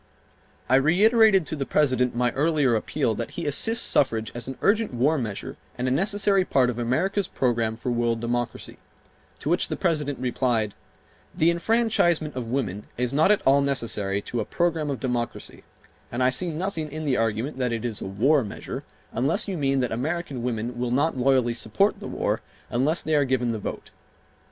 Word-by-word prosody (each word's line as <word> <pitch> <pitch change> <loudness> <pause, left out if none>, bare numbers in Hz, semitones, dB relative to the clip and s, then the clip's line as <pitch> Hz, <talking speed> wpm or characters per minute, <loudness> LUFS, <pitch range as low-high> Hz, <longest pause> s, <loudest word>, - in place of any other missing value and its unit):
I 130 - +5
reiterated 195 - +5
to 155 - -4
the 140 - -2
President 130 -4 +1
my 120 0 +1
earlier 145 -3 +2
appeal 115 +2 0
that 115 +2 -6
he 170 - -3
assist 225 +11 +1
suffrage 110 -5 +1
as 120 0 -6
an 130 - -6
urgent 210 - +2
war 140 +7 +2
measure 110 -5 -5 0.2
and 125 +1 -1
a - - +1
necessary 195 +5 +2
part 130 -7 +2
of 120 - -7
America's 180 - 0
program 115 -3 0
for 125 - -3
world 120 -1 0
democracy, 120 +1 -3 0.6
to - - -8
which - - +2
the - - -3
President 150 -5 0
replied: 120 -4 0 0.6
"The 165 +2 +4
enfranchisement 175 - +1
of 125 -3 -4
women 110 -6 -3
is 125 +1 -1
not 155 +6 +4
at 210 - +2
all 140 +1 +5
necessary 105 -8 -1
to 120 - -4
a - - 0
program 165 +2 -1
of 140 - -3
democracy 120 -2 -4 0.5
and 120 +2 -1
I 130 - +4
see 175 +7 +2
nothing 160 -2 -3
in 155 +1 -5
the 135 -3 +1
argument 115 +5 -1
that 125 -2 0
it 115 0 -3
is 115 -4 -3
a - - -4
war 130 +9 +2
measure 100 - -6 0.3
unless 145 - 0
you 195 - -2
mean 135 -4 +1
that 125 - -1
American 140 +2 -3
women 120 0 -3
will 125 0 -1
not 140 +6 +1
loyally 130 -2 +2
support 120 - 0
the - - -7
war - - -1 0.3
unless 140 +7 +1
they 160 - -1
are 145 -1 +4
given 130 -3 0
the 110 - -3
vote." - - -6
130 Hz, 190 wpm, -25 LUFS, 120-160 Hz, 0.6 s, I